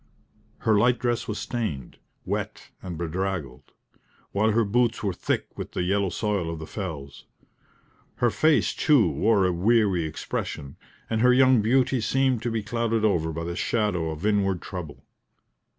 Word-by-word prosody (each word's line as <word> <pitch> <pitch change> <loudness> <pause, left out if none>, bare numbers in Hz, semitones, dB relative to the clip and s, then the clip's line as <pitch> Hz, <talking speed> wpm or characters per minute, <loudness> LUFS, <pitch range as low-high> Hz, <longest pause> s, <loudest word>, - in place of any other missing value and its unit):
Her 110 -3 +3
light 120 +3 +3
dress 120 -1 -1
was 105 - -3
stained, 110 - -4 0.3
wet - - -4
and 90 -3 -6
bedraggled; 85 -5 -4 0.6
while 105 +2 +2
her 115 +1 +2
boots 120 +3 +1
were 100 -3 0
thick - - -3
with - - -7
the - - -1
yellow 100 +1 +1
soil 100 -4 -1
of 85 - -4
the 80 - -7
fells. 80 -8 -7 0.9
Her 120 -1 +2
face, 155 +5 +3
too, 140 - +4
wore 105 +1 +2
a 90 - +1
weary 95 -2 +2
expression, 75 -2 -5 0.3
and 110 -1 -1
her 125 +1 +6
young 130 -2 +5
beauty 130 +3 +2
seemed 130 +1 +1
to 120 - -2
be 115 -2 -2
clouded 115 0 0
over 80 -6 +1
by 80 +1 -4
the 85 +1 -4
shadow 95 -7 0
of 80 +4 -5
inward 100 -3 +1
trouble. 85 -5 -8
105 Hz, 160 wpm, -25 LUFS, 85-115 Hz, 0.9 s, her